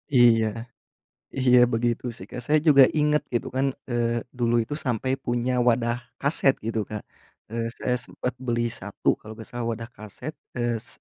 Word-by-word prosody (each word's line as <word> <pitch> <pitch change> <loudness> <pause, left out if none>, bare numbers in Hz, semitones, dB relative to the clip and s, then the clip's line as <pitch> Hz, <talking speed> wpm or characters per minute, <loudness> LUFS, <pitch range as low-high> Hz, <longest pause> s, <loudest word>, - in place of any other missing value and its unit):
Iya. 115 -2 +6 0.9
Iya, 125 -1 +5 0.2
begitu 120 +1 0
sih, - - -10
Kak. 125 - -6
Saya 155 +1 +4
juga 140 -2 +9
inget, 150 0 +3
gitu 120 - 0
kan. 135 +1 +2 0.3
Eee, 120 -1 0 0.2
dulu 120 0 +2
itu 110 - -16
sampai 125 +1 0
punya 120 +1 0 0.2
wadah 120 0 +3 0.3
kaset, 140 -2 +3
gitu, 115 -1 -1
Kak. 105 -1 -5 0.5
Eee, 115 0 -1
saya 125 -1 0
sempet 125 - -4
beli 120 -1 +1 0.2
1, - - -7
kalau 110 - -10
gak 110 - -9
salah, 120 -1 -3
wadah 115 +1 -6
kaset. 110 +8 -8 0.3
Eee, 120 -1 0
s - - -14
120 Hz, 170 wpm, -25 LUFS, 115-130 Hz, 0.9 s, juga